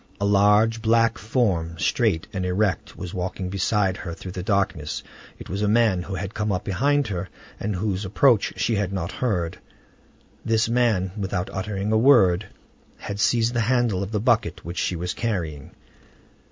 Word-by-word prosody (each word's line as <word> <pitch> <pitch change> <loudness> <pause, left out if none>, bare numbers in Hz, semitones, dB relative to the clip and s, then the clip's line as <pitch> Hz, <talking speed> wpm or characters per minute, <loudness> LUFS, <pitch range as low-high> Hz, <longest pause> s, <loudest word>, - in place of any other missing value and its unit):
A 100 - 0
large 105 +3 +4
black 115 -1 +2
form, 95 -7 0
straight 95 -3 +1
and 95 -2 -2
erect, 90 0 -1
was 90 - -6
walking 90 0 -3
beside 95 0 0
her 85 -4 -6
through 90 - -8
the 90 - -5
darkness; 95 -6 -1 0.3
it - - -10
was 100 +4 -3
a 105 - +2
man 110 -4 +3
who 95 +2 -5
had 95 +2 -5
come 105 -1 -1
up 90 0 -1
behind 140 +8 +1
her, 90 -2 -4 0.3
and 105 0 -2
whose 95 +1 -2
approach 110 +3 +3
she 115 - 0
had 100 -2 -1
not 95 -3 -3
heard. 90 -10 -2 0.8
This 110 0 +2
man, 115 -6 +1
without 95 -3 -3
uttering 100 +1 -3
a 110 - +3
word, 110 -7 +5 0.5
had 100 0 -6
seized 115 +2 +2
the 120 - 0
handle 115 -4 +1
of 100 +1 -4
the 105 - 0
bucket 120 +1 +1
which 85 +1 -4
she 90 - 0
was 90 +1 -3
carrying. 85 - -3
100 Hz, 175 wpm, -24 LUFS, 90-110 Hz, 0.8 s, word